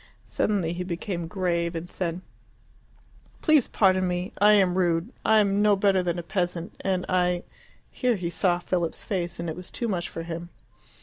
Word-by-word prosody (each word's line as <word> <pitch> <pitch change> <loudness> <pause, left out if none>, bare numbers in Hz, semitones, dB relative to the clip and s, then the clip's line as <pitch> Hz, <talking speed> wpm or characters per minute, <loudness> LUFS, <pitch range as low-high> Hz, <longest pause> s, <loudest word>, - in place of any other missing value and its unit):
Suddenly 185 -6 0
he 180 +1 -3
became 175 -1 -4
grave, 170 -2 -1
and 165 +1 -4
said, 175 -1 -3 1.2
"Please 310 -6 +4
pardon 185 -2 +3
me; 180 +1 -2
I 210 +1 +7
am 190 -3 +4
rude. 175 +4 +1
I 220 - +4
am 200 -1 +3
no 210 -1 +5
better 195 -1 +3
than 175 -1 -1
a 175 - -4
peasant, 175 -1 -2
and 185 -2 0
I 180 -1 +1 0.2
" - - -32
Here 250 -2 +1
he 175 -3 -3
saw 175 -1 +2
Philip's 175 -1 -2
face, 175 -5 -3
and 170 - -3
it 160 - -3
was 180 0 -9
too 235 - -3
much 180 -5 -2
for 165 - -6
him. 170 +1 -6
180 Hz, 185 wpm, -26 LUFS, 170-195 Hz, 1.2 s, I